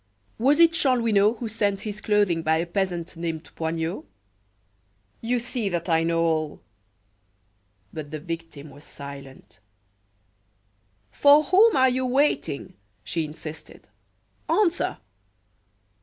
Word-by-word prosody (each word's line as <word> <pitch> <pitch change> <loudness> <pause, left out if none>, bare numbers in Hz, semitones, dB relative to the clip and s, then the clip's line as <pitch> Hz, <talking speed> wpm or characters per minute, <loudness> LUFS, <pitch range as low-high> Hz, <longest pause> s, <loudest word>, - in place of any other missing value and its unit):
Was 280 +6 +3
it 335 -1 +7
Chanlouineau 230 -8 +2
who 235 0 -5
sent 205 -3 -1
his 210 -1 -6
clothing 205 -6 +2
by 160 0 +2
a 165 - -1
peasant 175 -2 -3
named 165 -1 -5
Poignot? 165 +2 -3 1.2
You 245 +2 0
see 240 -3 -2
that 175 -1 -3
I 165 -1 +3
know 165 0 +1
all 155 -2 -1 0.7
" 100 0 -43
But 155 -2 -7
her 155 - -4
victim 165 -2 -7
was 145 +2 -15
silent. 140 -6 -11 1.5
"For 290 - +6
whom 395 +8 +5
are 260 -1 +5
you 255 0 -1
waiting?" 250 - 0 0.3
she 165 -2 -2
insisted. 155 +1 -10 0.6
"Answer!" 365 -5 +1
170 Hz, 120 wpm, -25 LUFS, 155-240 Hz, 1.5 s, it